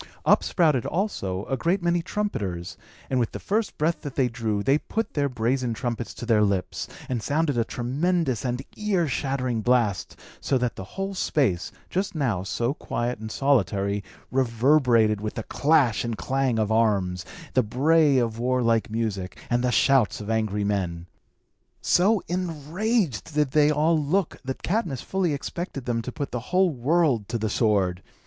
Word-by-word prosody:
Up -, -, +5 dB
sprouted, 155 Hz, -, +2 dB
also, 105 Hz, -, -2 dB
a 135 Hz, -, -1 dB
great 170 Hz, +8 st, 0 dB
many 175 Hz, 0 st, +2 dB
trumpeters; 100 Hz, -, -3 dB, 0.3 s
and 130 Hz, -, 0 dB
with 115 Hz, -, -1 dB
the -, -, -5 dB
first 215 Hz, +1 st, -1 dB
breath 160 Hz, +3 st, 0 dB
that 145 Hz, -3 st, -7 dB
they 130 Hz, -3 st, +3 dB
drew, 110 Hz, -4 st, -2 dB
they 140 Hz, +5 st, +3 dB
put 225 Hz, +5 st, -3 dB
their 140 Hz, -1 st, +1 dB
brazen 125 Hz, 0 st, -1 dB
trumpets 120 Hz, 0 st, -4 dB
to -, -, -6 dB
their 115 Hz, -3 st, +3 dB
lips, 100 Hz, -3 st, -1 dB, 0.2 s
and 125 Hz, -3 st, -2 dB
sounded 145 Hz, +2 st, 0 dB
a 115 Hz, -, +2 dB
tremendous 135 Hz, -, -1 dB
and 125 Hz, 0 st, -2 dB
ear 195 Hz, -6 st, 0 dB
shattering 130 Hz, -3 st, -1 dB
blast; 115 Hz, -6 st, +1 dB, 0.2 s
so 135 Hz, -, +1 dB
that 125 Hz, -2 st, -1 dB
the -, -, -6 dB
whole 195 Hz, +1 st, -2 dB
space, 130 Hz, -, 0 dB, 0.2 s
just 190 Hz, 0 st, -2 dB
now 125 Hz, -, 0 dB
so 115 Hz, +6 st, -1 dB
quiet 120 Hz, -5 st, -3 dB
and 110 Hz, 0 st, -6 dB
solitary, 100 Hz, -7 st, +1 dB, 0.3 s
reverberated 120 Hz, -3 st, +3 dB
with 105 Hz, 0 st, -4 dB
the 115 Hz, -, -3 dB
clash 140 Hz, -5 st, +2 dB
and 115 Hz, -2 st, -3 dB
clang 135 Hz, -1 st, 0 dB
of 110 Hz, -1 st, 0 dB
arms, 100 Hz, -5 st, +1 dB, 0.3 s
the 130 Hz, -, +4 dB
bray 140 Hz, +5 st, +3 dB
of 115 Hz, -2 st, 0 dB
warlike 120 Hz, -3 st, +1 dB
music, 105 Hz, -4 st, -3 dB
and 120 Hz, 0 st, +2 dB
the 125 Hz, -, +2 dB
shouts 135 Hz, -3 st, +3 dB
of 105 Hz, +1 st, -4 dB
angry 110 Hz, -2 st, 0 dB
men. 90 Hz, -5 st, -2 dB, 0.7 s
So 195 Hz, +3 st, +3 dB
enraged 175 Hz, -, -1 dB
did 150 Hz, -3 st, +2 dB
they 150 Hz, 0 st, +4 dB
all 155 Hz, +2 st, +3 dB
look, 175 Hz, +5 st, 0 dB
that 130 Hz, 0 st, -5 dB
Cadmus 175 Hz, -, -1 dB
fully 190 Hz, -3 st, 0 dB
expected 140 Hz, -2 st, -5 dB
them 115 Hz, -2 st, 0 dB
to 125 Hz, -, -6 dB
put 140 Hz, +2 st, -5 dB
the 125 Hz, -, -2 dB
whole 185 Hz, -1 st, +3 dB
world 135 Hz, -4 st, +1 dB
to 115 Hz, -, -1 dB
the 110 Hz, -1 st, -2 dB
sword. 95 Hz, -6 st, +1 dB
125 Hz, 170 wpm, -25 LUFS, 110-155 Hz, 0.7 s, Up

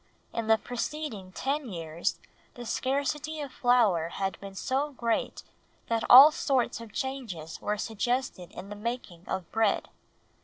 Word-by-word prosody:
In 230 Hz, -1 st, -2 dB
the 220 Hz, 0 st, +6 dB
preceding 245 Hz, -4 st, -5 dB
ten 275 Hz, +5 st, -2 dB
years 165 Hz, -2 st, -3 dB, 0.4 s
the 245 Hz, -, -8 dB
scarcity 285 Hz, +5 st, -1 dB
of 285 Hz, -3 st, -5 dB
flour 230 Hz, -, +3 dB
had 195 Hz, +2 st, -3 dB
been 195 Hz, -1 st, -9 dB
so 275 Hz, +8 st, -1 dB
great 235 Hz, -3 st, -1 dB, 0.5 s
that 230 Hz, -1 st, +1 dB
all 275 Hz, +5 st, +11 dB
sorts 265 Hz, -7 st, 0 dB
of 230 Hz, -2 st, -10 dB
changes 220 Hz, -, -5 dB
were 210 Hz, 0 st, -1 dB
suggested 225 Hz, -3 st, -2 dB
in 195 Hz, -, -8 dB
the 205 Hz, -, -6 dB
making 210 Hz, -6 st, -5 dB
of 190 Hz, -3 st, -4 dB
bread. 220 Hz, -2 st, +1 dB
230 Hz, 145 wpm, -28 LUFS, 195-265 Hz, 0.5 s, all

